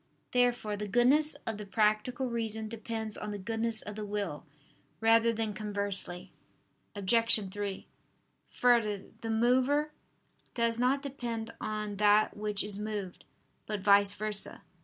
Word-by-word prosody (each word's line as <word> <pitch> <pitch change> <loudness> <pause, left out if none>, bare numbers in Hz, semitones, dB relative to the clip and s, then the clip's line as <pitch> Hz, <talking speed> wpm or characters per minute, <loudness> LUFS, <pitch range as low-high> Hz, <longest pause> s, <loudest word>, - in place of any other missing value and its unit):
Therefore 245 -4 +1
the 210 0 -5
goodness 270 +8 +4
of 220 -2 -4
the 210 - -6
practical 215 +5 +1
reason 220 -2 -3
depends 220 -1 -5
on 210 - -5
the 205 - -4
goodness 225 +2 -2
of 210 - -7
the 215 - -5
will, 200 -7 -4 0.5
rather 225 +1 +4
than 220 -2 -2
conversely. 200 -3 -2 0.6
Obj. 210 0 +4
3: 205 -1 -5 0.6
Further, 225 -5 +2 0.2
the 225 - -5
mover 255 +6 +2 0.6
does 230 -1 +1
not 265 +3 +2
depend 235 -5 -5
on 210 -1 -4
that 210 +1 +4
which 210 -1 -2
is 205 -1 -1
moved, 210 -4 -5 0.4
but 210 -2 -3
vice 200 0 +6
versa. 210 0 -1
215 Hz, 135 wpm, -30 LUFS, 205-235 Hz, 0.6 s, vice